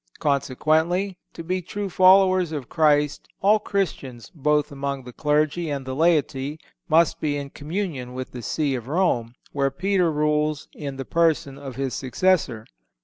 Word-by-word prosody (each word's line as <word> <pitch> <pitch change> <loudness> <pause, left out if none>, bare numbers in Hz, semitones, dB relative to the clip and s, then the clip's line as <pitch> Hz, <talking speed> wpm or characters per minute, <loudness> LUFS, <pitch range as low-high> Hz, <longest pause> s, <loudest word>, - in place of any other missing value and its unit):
Consequently, 160 +7 0
to 165 - -8
be 185 +2 -2
true 200 +3 -4
followers 185 -2 +5
of 145 -6 -5
Christ 150 -2 +2
all 210 +2 +4
Christians, 140 - -3
both 150 0 +1
among 140 -1 -4
the 125 0 -11
clergy 150 +3 0
and 140 -2 -3
the 130 - -4
laity, 150 -2 +1 0.3
must 165 +1 +3
be 145 -2 0
in 140 -1 -6
communion 145 -6 -4
with 130 0 -5
the 125 - -7
See 145 +3 -1
of 120 -2 -4
Rome, 130 -8 0 0.2
where 140 -1 +1
Peter 180 +4 +1
rules 150 0 0
in 140 -3 -6
the 135 - -5
person 160 -5 +1
of 135 -3 -8
his 135 -1 -2
successor. 130 - 0
150 Hz, 155 wpm, -24 LUFS, 135-170 Hz, 0.3 s, followers